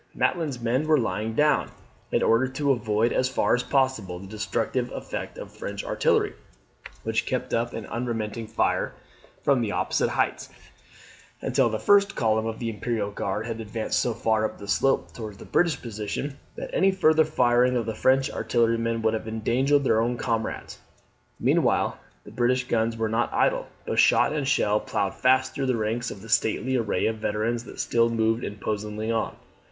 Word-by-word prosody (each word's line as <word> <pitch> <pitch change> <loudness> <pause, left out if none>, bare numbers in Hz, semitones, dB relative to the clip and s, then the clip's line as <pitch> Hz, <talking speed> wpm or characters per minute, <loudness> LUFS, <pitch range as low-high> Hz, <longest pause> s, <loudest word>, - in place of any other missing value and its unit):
Maitland's 155 -8 0
men 125 +6 0
were 155 -1 +5
lying 110 -2 -2
down, 150 +2 +3 0.4
in - - +2
order 115 +3 +3
to 140 +2 0
avoid 115 -2 +1
as 130 - +1
far 130 - +1
as 125 - +2
possible 130 -10 0
the 95 - -10
destructive 110 +4 -2
effect - - -6
of - - -8
the - - -20
French - - -5
artillery, - - +1 0.7
which - - -1
kept - - -2
up 120 +1 0
an - - -5
unremitting 115 -2 -3
fire 110 - 0 0.5
from 135 -3 +3
the 110 -3 -1
opposite - - 0
heights, - - -1 0.9
until 130 -3 +2
the 110 - -2
first 200 - +4
column 110 -1 +1
of 110 0 -4
the 115 - -4
Imperial 105 -1 -2
Guard 100 +1 -3
had 115 -1 -4
advanced 110 0 -2
so 120 -2 0
far 110 -1 +1
up 110 - -2
the 100 - -10
slope 135 +6 +1
towards 110 -4 -7
the - - -11
British 170 -6 +1
position, 115 +5 -5 0.2
that - - -6
any 195 - +4
further 160 -4 +4
firing 125 -4 +3
of 115 - -1
the 110 - -2
French 130 +4 +2
artillerymen 115 -1 0
would 110 0 +2
have 110 0 -3
endangered 130 +6 +1
their 110 -4 +3
own 120 +1 0
comrades. 115 -2 -3 0.6
Meanwhile - - +2 0.2
the - - -12
British 125 +1 +1
guns 115 0 0
were 110 0 0
not 115 +2 0
idle; - - +1 0.2
but - - -1
shot - - +5
and 145 -3 -1
shell 105 -6 +2
ploughed 100 -2 -2
fast 130 0 +2
through 135 -1 -2
the 125 -2 +1
ranks 115 +2 -1
of 95 - -9
the 115 - -11
stately 120 +4 +1
array 115 -4 0
of 110 0 0
veterans 110 +2 -1
that - - -11
still 115 0 +2
moved 115 0 +1
imposingly 105 +1 -3
on. 115 -1 -1
115 Hz, 180 wpm, -26 LUFS, 110-130 Hz, 0.9 s, were